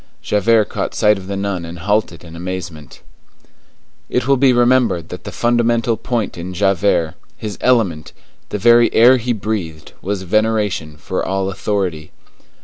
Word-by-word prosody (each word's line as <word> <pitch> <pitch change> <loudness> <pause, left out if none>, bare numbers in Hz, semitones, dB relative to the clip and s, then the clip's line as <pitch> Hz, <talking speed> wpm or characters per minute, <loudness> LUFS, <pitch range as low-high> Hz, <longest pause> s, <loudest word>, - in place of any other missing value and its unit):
Javert 110 +1 +3
caught - - -4
sight 105 -1 +3
of 95 - -11
the 100 0 -3
nun 100 -3 -3
and 85 +1 -8
halted 100 -1 -1
in 85 -1 -11
amazement. 85 -4 -7 1.1
It 125 0 -1
will 140 - +4
be 135 0 +4
remembered 120 -8 +2
that 90 - -9
the 100 - -6
fundamental 120 0 +1
point 115 -4 -3
in 90 +2 -6
Javert, 95 -4 +1 0.2
his 105 -2 -6
element, 100 -12 +1 0.4
the - - -3
very 120 +2 +5
air 125 +3 +7
he 125 0 -2
breathed, 100 -8 -4
was 95 0 -3
veneration 105 -6 0
for 90 +5 -3
all 95 0 -1
authority. 95 -5 -3
100 Hz, 150 wpm, -18 LUFS, 90-115 Hz, 1.1 s, air